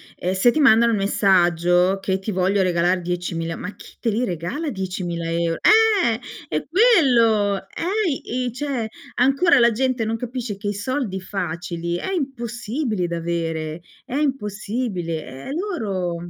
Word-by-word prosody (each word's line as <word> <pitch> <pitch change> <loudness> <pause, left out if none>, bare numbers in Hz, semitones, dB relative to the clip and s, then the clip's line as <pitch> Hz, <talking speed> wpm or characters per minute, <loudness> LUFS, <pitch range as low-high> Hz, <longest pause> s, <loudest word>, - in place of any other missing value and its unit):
ehm, 180 +1 -2
se 190 +6 +4
ti 310 - -1
mandano 235 -3 +6
un 210 - +1
messaggio, 180 -1 +3
che 190 0 -1
ti 195 +3 -4
voglio 190 +1 +1
regalare 180 0 +2
10000, 170 -1 -3
ma 205 - -7
chi - - -15
te 230 - 0
li 230 +4 0
regala 200 - -3
10000 180 -5 -4
eur 165 0 0
eh 425 - +4 0.3
è 155 - -2
quello, 245 - +4
eh 350 - -2
i - - -1
c'è 260 -3 -3 0.3
ancora 275 +4 +4
la 235 0 +5
gente 255 0 0
non 225 +1 -1
capisce 245 -2 -4
che 205 +1 -4
i 205 - -1
soldi 210 -1 -2
facili, 170 -2 -4
è 385 - -4
impossibile 240 - -2
da 170 - -3
avere, 165 -1 -3 0.2
è 255 - -5
impossibile 210 - -3
e - - -6
loro 215 - -2
205 Hz, 150 wpm, -22 LUFS, 175-255 Hz, 0.3 s, mandano